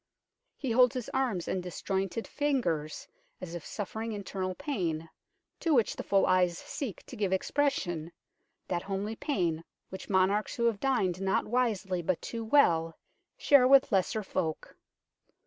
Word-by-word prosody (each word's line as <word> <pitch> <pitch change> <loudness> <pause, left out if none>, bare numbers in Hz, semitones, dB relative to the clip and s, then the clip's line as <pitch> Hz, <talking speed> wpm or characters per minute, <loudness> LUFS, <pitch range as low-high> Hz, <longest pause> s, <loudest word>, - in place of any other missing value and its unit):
He 265 -4 -3
holds 250 +1 +5
his 250 -3 -4
arms 245 -10 -1
and 185 - -1
disjointed 190 +4 -3
fingers 180 - -1 0.3
as 175 -2 -7
if 170 -3 -6
suffering 220 +2 -5
internal 190 -2 -4
pain, 165 - -3 0.5
to 325 -3 +2
which 235 -4 +2
the - - -4
full 195 -1 +2
eyes 180 -2 +3
seek 255 -9 -6
to - - -10
give 205 -4 -1
expression, 190 - 0 0.6
that 175 -1 -1
homely 200 +3 -3
pain 175 - -1 0.3
which 190 - -8
monarchs 195 +2 +2
who 235 - 0
have 225 -4 +1
dined 195 -9 0
not 195 0 +1
wisely 210 -7 0
but 170 +1 0
too 230 -1 -5
well 170 - +3 0.4
share 275 -3 +5
with 270 -1 +6
lesser 200 +2 +1
folk. 165 -5 -3
195 Hz, 145 wpm, -30 LUFS, 180-240 Hz, 0.6 s, with